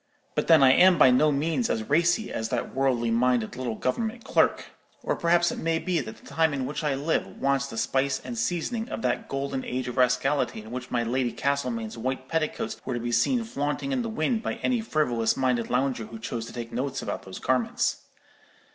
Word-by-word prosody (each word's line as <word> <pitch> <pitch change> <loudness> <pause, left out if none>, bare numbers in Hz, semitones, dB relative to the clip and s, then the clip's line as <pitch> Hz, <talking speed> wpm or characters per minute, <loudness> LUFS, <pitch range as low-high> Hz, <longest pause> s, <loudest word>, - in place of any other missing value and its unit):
But - - -1
then 160 -4 +7
I 130 - +8
am 180 +5 +6
by 130 - +7
no 150 +5 +4
means 160 - 0
as 110 - 0
racy 170 - +1
as 110 0 -2
that 125 0 -2
worldly 130 -3 +1
minded 120 -1 +1
little 125 -3 -3
government 225 - -2
clerk; - - +1 0.3
or - - 0
perhaps 170 0 +3
it - - -5
may 165 0 0
be 175 0 0
that 110 -3 -8
the - - -19
time 160 -2 +1
in 135 -2 -2
which 150 +4 -4
I 145 -3 +1
live 150 +4 0
wants 140 0 +1
the 115 - -8
spice 135 +4 +1
and 240 - -5
seasoning 225 +3 -2
of - - -5
that - - -1
golden 135 -1 -2
age 125 0 -3
of 125 - -5
rascality 125 -2 +1
in 110 - -11
which 125 0 -5
my 120 -1 0
Lady 120 +1 0
Castlemain's 125 -5 -2
white 130 +2 -3
petticoats 160 0 -2
were 125 - -3
to - - -2
be 120 +1 -3
seen 230 - +2
flaunting 150 - -3
in 265 -2 0
the 230 - -3
wind 225 +1 0
by - - -3
any 250 -3 +1
frivolous 125 - 0
minded 125 -3 +1
lounger 125 -2 0
who 115 - -9
chose 115 +1 -5
to - - -10
take 120 -1 -6
notes 135 +2 -2
about - - -4
those 95 - -9
garments. 130 -2 0
135 Hz, 215 wpm, -26 LUFS, 120-160 Hz, 0.3 s, I